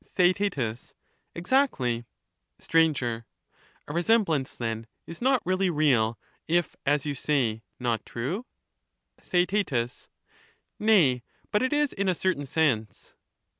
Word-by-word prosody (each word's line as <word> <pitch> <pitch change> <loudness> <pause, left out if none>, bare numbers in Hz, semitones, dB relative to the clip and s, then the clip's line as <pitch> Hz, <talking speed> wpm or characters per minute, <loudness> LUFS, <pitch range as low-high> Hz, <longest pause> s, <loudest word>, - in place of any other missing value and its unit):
TheaeU 180 - +1 0.4
Exactly. 170 - +1 0.5
Str. 165 - -2 0.3
A 115 -1 -2 0.7
resemblance, 170 - +1
then, 115 -1 -4 0.2
is 165 - -9
not 260 0 +2
really 185 +1 +1
real, 130 -9 +2 0.3
if, 170 0 +1
as 145 0 +2
you 145 - -1
say, 125 -6 0 0.2
not 120 -3 -1
true? 170 - -4 0.7
Theaet. 175 - 0 0.7
Nay, 175 - +4 0.3
but 210 - +2
it 260 - +1
is 295 -1 +1
in 195 -1 0
a 180 - +1
certain 160 -6 -1
sense. 130 -9 -1
155 Hz, 110 wpm, -27 LUFS, 120-195 Hz, 0.7 s, Nay